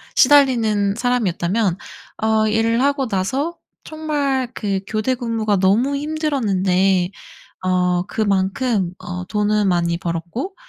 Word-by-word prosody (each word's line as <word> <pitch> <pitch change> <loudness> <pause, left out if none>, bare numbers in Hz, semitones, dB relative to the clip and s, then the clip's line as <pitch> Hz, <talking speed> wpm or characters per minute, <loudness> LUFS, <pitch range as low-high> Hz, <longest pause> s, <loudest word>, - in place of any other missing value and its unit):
시달리는 225 -8 +4
사람이었다면 210 -5 0 0.5
어 220 0 +2
일을 225 +2 +1
하고 280 -1 +1
나서 260 - -2 0.3
정말 285 -5 -2
그 200 -3 -2
교대 225 +4 -1
근무가 225 -4 -1
너무 215 +9 +2
힘들었는데 195 - +1 0.5
어 180 -1 +1
그만큼 200 -1 0
어 180 0 -6
돈은 210 0 +1
많이 170 -1 +1
벌었고 175 - -4
215 Hz, 245 characters per minute, -20 LUFS, 190-260 Hz, 0.5 s, 시달리는